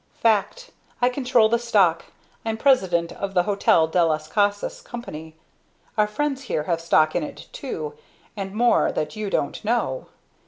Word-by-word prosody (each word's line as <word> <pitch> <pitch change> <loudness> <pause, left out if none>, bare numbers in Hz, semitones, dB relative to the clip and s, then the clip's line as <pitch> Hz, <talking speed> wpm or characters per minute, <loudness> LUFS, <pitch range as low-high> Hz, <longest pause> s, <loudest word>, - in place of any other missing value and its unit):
"Fact. 230 - 0 0.3
I 245 - +3
control 250 -3 +3
the 235 +1 +1
stock 195 -8 +2 0.4
I'm 225 -1 -2
president 185 -10 +2
of 195 -1 -5
the 180 - +4
Hotel 195 -4 +3
del 165 +1 +2
las 155 -1 -1
Casas 205 +3 0
Company. 160 -10 -8 0.6
Our 210 -1 +3
friends 275 +5 -2
here 155 -10 -1
have 165 +1 -1
stock 155 -2 +3
in - - +1
it, 290 -2 -7
too, 460 -2 -5 0.4
and 195 -2 -5
more 235 +4 +3
that 150 0 -3
you 215 -1 -3
don't 140 -6 -2
know. 215 - -1
205 Hz, 160 wpm, -23 LUFS, 170-240 Hz, 0.6 s, the